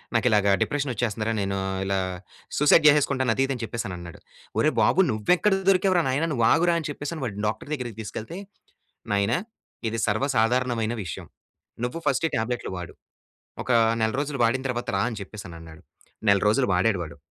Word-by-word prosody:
నాకు 115 - +2
ఇలాగా 105 -2 +3
డిప్రెషన్ 145 -2 0
వచ్చేస్తుంది 110 -1 -2
రా. - - +1
నేను 100 0 -1 0.3
ఇలా 95 0 0 0.6
సూసైడ్ 150 +2 +5
చేసేసుకుంటాను! 140 -4 +3
అది 135 - +2
ఇది 135 - -2
అని 120 - -6
చెప్పేసి 115 +1 -4
అని 90 - -5
అన్నాడు. 85 -1 -10 0.4
ఒరేయ్! - - +2
బాబు - - +3
నువ్వు 110 +9 +2
ఎక్కడ 210 +2 +2 0.2
దొరికావు 190 0 +3
రా 170 - +3
నాయనా. 145 +6 +1
నువ్వు 120 -4 +2
ఆగురా, 170 +1 +3
అని 160 - -4
చెప్పేసి 145 +2 -5
వాడిని 105 -3 -5
డాక్టర్ 110 +6 -4
దగ్గరికి 120 -7 -5
తీసుకెళ్తే, 110 - -6 0.8
నాయనా 100 +4 +2 0.5
ఇది 115 +1 -3
సర్వసాధారణమైన 115 0 +1
విషయం. 85 - -6 0.6
నువ్వు 125 +7 -2
ఫస్ట్ 140 +3 +2
టాబ్లెట్లు 120 +1 -2
వాడు. 90 -1 -7 0.7
ఒక - - -7 0.3
నెల 110 0 +1
రోజులు 145 -1 -3
వాడిన 125 +3 +1
తర్వాత 120 -1 -3
రా 95 - +1
అని 115 -3 -6
చెప్పేసి 100 +1 -8
అని 85 - -9
అన్నాడు. 80 -1 -13 0.5
నెల 100 0 +6
రోజులు 125 +5 +3
వాడాడు 95 +3 +2
వాడు. 80 - -8
115 Hz, 180 wpm, -25 LUFS, 105-140 Hz, 0.8 s, నెల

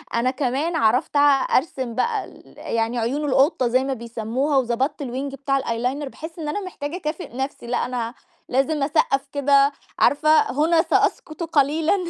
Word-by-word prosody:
أنا 250 +2 +2
كمان 280 +5 -1
عرفت 255 +1 +2
اع 285 -1 +4
أرسم 260 -4 -2
بقى 445 - 0
ال - - -17
يعني 230 +1 -1
عيون 270 +7 -1
القطة 270 -1 +3
زي 255 +2 +2
ما 270 0 -1
بيسَمّوها 235 +4 -2
وضبطت 265 +4 0
الwing 270 +2 -4
بتاع 275 0 0
الeyeliner 250 +5 -2
باحس 320 +4 -9
إن 310 - -4
أنا 355 +8 -2
محتاجة 335 -5 -6
اكافئ 315 -5 -5
نَفْسي 265 -2 -4
لأ 245 - 0
أنا 245 -2 -3 0.4
لازم 275 +3 +1
اسقّف 275 -1 +1
كده 280 0 +4 0.3
عارفة، 305 +2 +3 0.2
هنا 325 +3 +3
سأسكت 330 -1 0
قليلًا 310 +1 +2
275 Hz, 160 wpm, -22 LUFS, 250-305 Hz, 0.4 s, اع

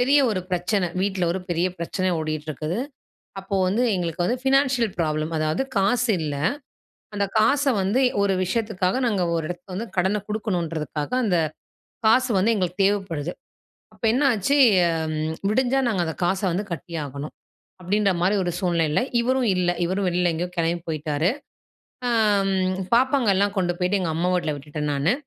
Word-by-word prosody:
பெரிய 275 +4 +4
ஒரு 190 -4 -1
பிரச்சன. 180 +1 0
வீட்ல 190 -2 0
ஒரு 190 - -3
பெரிய 175 +1 +1
பிரச்சன 185 +2 -1
ஓடிட்டு 155 0 -4
இருக்குது. 155 - -3 0.6
அப்போ 195 +1 -4
வந்து 210 +7 +1
எங்களுக்கு 175 -1 -2
வந்து 245 +7 0
ஃபினான்ஷியல் 265 -5 +2
ப்ராப்ளம், 155 0 -1
அதாவது 155 +10 0
காசு 225 +5 +2
இல்ல. 145 -2 -2 0.8
அந்த 200 0 +1
காச 275 +7 +3 0.2
வந்து 200 +7 +1 0.2
ஒரு 200 -1 +2
விஷயத்துக்காக 210 0 -1
நாங்க 200 -5 +1
ஒரு 165 - -1
இடத்துக்கு 175 +2 -8
வந்து 225 +5 -4
கடன 190 +4 +2
குடுக்கணுன்றதுக்காக, 170 -8 -3
அந்த 185 -5 +2 0.7
காசு 250 +3 +4
வந்து 220 +5 +3
எங்களுக்கு 180 0 -1
தேவைப்படுது. 185 -6 -1 0.6
அப்ப - - -13
என்னாச்சு 260 -1 +2 0.6
ம் 155 +1 -2 0.2
விடிஞ்சா 260 +4 +2
நாங்க 190 -6 0
அந்த 160 - -3
காச 190 +2 +1
வந்து 195 +4 -1
கட்டி 170 +2 -7
ஆகணும். 140 +2 -7 0.5
அப்பிடின்றமாரி 190 0 +1
ஒரு 175 - -1
சூழ்நிலையில 170 -5 +1 0.2
இவரும் 255 0 +1
இல்ல. 180 -1 +1 0.2
இவரும் 190 +2 -1
வெளில 180 0 +1
எங்கேயோ 175 +3 -3
கிளம்பி 170 +1 0
போயிட்டாரு. 155 +1 0 0.8
ஆ - - +1 0.4
ம் 185 -1 0 0.2
பாப்பாங்க 260 -1 +2
எல்லாம் 200 +2 +1
கொண்டு 180 -2 +1
போயிட்டு 185 +2 +1
எங்க 175 -3 -1
அம்மா 175 +3 0
வீட்ல 170 -4 0
விட்டுட்டேன் 150 +1 -4
நானு. 145 +8 +2
185 Hz, 155 wpm, -23 LUFS, 165-210 Hz, 0.8 s, பெரிய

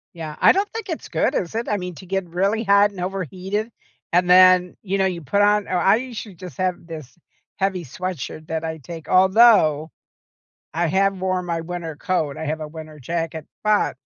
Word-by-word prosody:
Yeah. 155 -2 -7
I - - +6
don't 400 +2 0
think 450 -3 -6
it's 325 - -5
good, - - 0
is 175 +2 -2
it? 230 +1 -2
I 210 - 0
mean, 180 -2 -5
to 185 - -12
get 195 -1 -3
really 195 +6 0
hot 200 0 +5
and 190 -3 -8
overheated, 190 - -3 0.4
and 180 +1 +3
then, 185 0 +6
you 195 -1 -2
know, 190 - +2
you 180 -3 -2
put 175 +9 0
on 205 0 +3
oh, 185 - -1
I 195 +4 +4
usually 235 -6 -7
just 180 -5 -10
have 185 -1 0
this 155 -3 -9 0.4
heavy 190 -3 -1
sweatshirt 155 0 -6
that 160 0 -3
I 160 0 -4
take. 165 +2 -10
Although, 185 -6 +5 0.8
I 170 +1 0
have 195 +3 +1
worn 185 -1 -1
my 170 -1 -2
winter 165 -1 -6
coat. 155 -6 -2
I 160 - -4
have 155 +1 -2
a 150 - -6
winter 155 -1 -10
jacket, 165 +2 -4 0.2
but 210 -1 +2
180 Hz, 200 wpm, -22 LUFS, 160-195 Hz, 0.8 s, I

